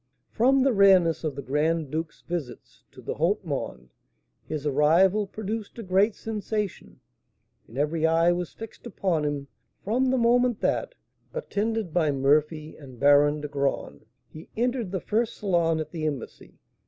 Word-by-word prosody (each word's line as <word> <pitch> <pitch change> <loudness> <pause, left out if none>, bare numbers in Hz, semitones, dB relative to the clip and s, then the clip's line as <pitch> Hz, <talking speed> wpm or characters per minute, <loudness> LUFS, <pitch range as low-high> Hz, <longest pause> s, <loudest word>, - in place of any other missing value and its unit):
From 260 +3 +3
the 270 -2 +3
rareness 190 -6 +5
of 155 -4 -2
the 140 - -6
Grand 150 +2 0
Duke's 160 +1 -4
visits 170 -8 -6
to - - -14
the - - -3
haut - - 0
monde, 65 0 -5 0.5
his 150 -2 -4
arrival 170 +8 +3
produced 215 +2 -5
a 230 - -6
great 195 +3 +2
sensation, 210 -2 -4 0.7
and 115 - -12
every 155 +3 +1
eye 165 +1 +4
was 175 -1 -2
fixed 225 +2 -10
upon 185 -7 -1
him 145 -1 -3 0.4
from 250 +6 +1
the 260 - +2
moment 245 0 +3
that, - - -1 0.4
attended 220 - -2
by 165 -4 +2
Murphy 150 +3 +1
and 130 -5 -13
Baron 145 +1 +4
de 150 - -4
Graün, 140 -1 -2 0.3
he 155 +1 -13
entered 240 -4 -1
the 190 -3 -2
first 225 +1 -1
salon 170 -5 +1
at 155 - -5
the 155 -3 -2
embassy. 140 -6 -7
170 Hz, 155 wpm, -26 LUFS, 150-215 Hz, 0.7 s, rareness